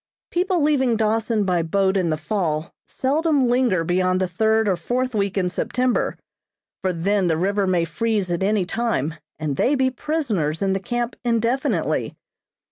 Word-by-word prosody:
People 360 -2 +1
leaving 265 -5 +2
Dawson 220 0 +1
by 180 -3 +1
boat 190 +4 +1
in 185 -3 +1
the 155 - 0
fall 155 -1 -2
seldom 285 0 +1
linger 240 -8 +2
beyond 185 +2 +1
the 185 - +1
third 220 +4 +1
or 190 - +2
fourth 250 +8 -2
week 200 -2 -1
in 185 -2 +1
September, 250 +7 0 0.6
for 185 - 0
then 190 +3 +1
the 160 -2 +1
river 200 +3 +1
may 175 -2 +2
freeze 200 +3 -1
at 175 - -1
any 200 -1 +1
time 180 - -1 0.2
and 150 -3 -3
they 285 - +2
be 260 -1 +2
prisoners 220 - -1
in 195 -1 +1
the 195 - 0
camp 240 +4 -3
indefinitely. 235 +2 0
205 Hz, 165 wpm, -22 LUFS, 180-245 Hz, 0.6 s, leaving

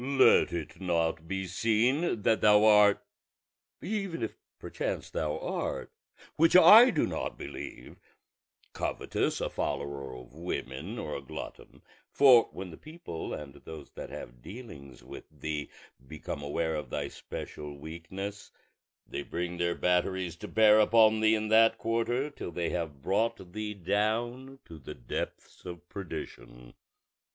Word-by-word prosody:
Let 135 0 +5
it - - -6
not 80 -2 0
be 95 +1 -3
seen 115 - +1
that 110 +2 +3
thou 105 0 +6
art 105 -1 +5 0.8
(even 195 - -3
if 110 - -4 0.2
perchance - - -4
thou 75 -1 -2
art, - - -4 0.5
which 165 +2 +4
I 225 +7 +10
do 160 -11 +1
not - - -4
believe) - - -8 0.8
covetous, - - -2
a - - 0
follower 70 -2 -4
of 60 0 -12
women, 80 - -5
or 75 - -4
a - - -5
glutton; 70 - -9 0.3
for 130 -5 +6
when 95 -1 -7
the 80 - -11
people 155 - -8
and 70 -2 -6
those 80 -3 -11
that - - -8
have - - -9
dealings 70 - -11
with - - -10
thee 75 0 -5 0.4
become 75 -1 -6
aware 80 +3 -1
of 75 -1 -4
thy - - -3
special 75 -1 -8
weakness 85 +7 -7 0.6
they - - -5
will - - -13
bring 90 0 -3
their 85 0 +1
batteries 90 -1 0
to - - -8
bear 110 -1 +5
upon 110 0 +5
thee 110 0 +4
in 110 0 -2
that 115 +1 +5
quarter, 120 +6 -1
till 140 - -7
they 85 0 -2
have 80 -6 -4
brought 100 -2 -1
thee 105 -1 -4
down 115 +8 -1
to 80 -2 -11
the 65 - -9
depths - - -6
of 90 -1 -9
perdition. 60 -10 -8
95 Hz, 145 wpm, -29 LUFS, 80-115 Hz, 0.8 s, I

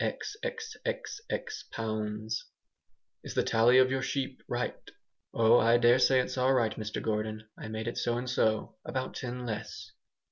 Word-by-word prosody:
xxxx 450 -1 -4
pounds 110 0 -3 0.8
"Is - - -7
the - - +3
tally 115 +3 +5
of 130 0 +6
your 130 0 0
sheep 135 -1 -2
right?" - - -1 0.6
"Oh! 115 +1 +5
I 115 +1 +5
daresay 125 +2 +5
it's 130 +1 -1
all 130 +1 +4
right, 115 -4 +2
Mr 110 -1 -4
Gordon, 110 0 -2
I - - -8
made 110 +1 -4
it 120 - -2
so 120 0 0
and 125 +1 -3
so; 110 -3 +1
about 130 -1 -3
ten 125 0 -5
less." 110 -1 -5
120 Hz, 150 wpm, -30 LUFS, 110-130 Hz, 0.8 s, of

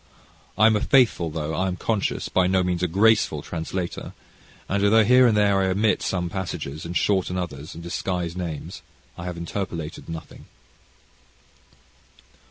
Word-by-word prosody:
I 110 - +5
am 110 -1 +5
a 105 - 0
faithful, 120 -11 +3
though 80 0 -4
I 95 +3 0
am 90 - -2
conscious, 105 +2 -1
by 90 -1 +2
no 95 0 +2
means 90 -1 -1
a 90 - +2
graceful 100 -4 +3
translator, 85 +2 -5 0.5
and 100 +1 0
although 110 +2 +5
here 125 +3 +6
and 110 -3 +2
there 100 -2 +3
I 95 - +1
omit 100 +3 +1
some 90 -2 -1
passages, 85 -5 -5
and 85 +1 -2
shorten 95 -2 +1
others, 75 -5 -5
and 85 - -9
disguise 85 0 -3
names, 85 -5 -5 0.3
I 85 - -8
have 90 -1 -5
interpolated 85 -3 -5
nothing. 80 -1 -8
90 Hz, 160 wpm, -24 LUFS, 85-100 Hz, 0.5 s, here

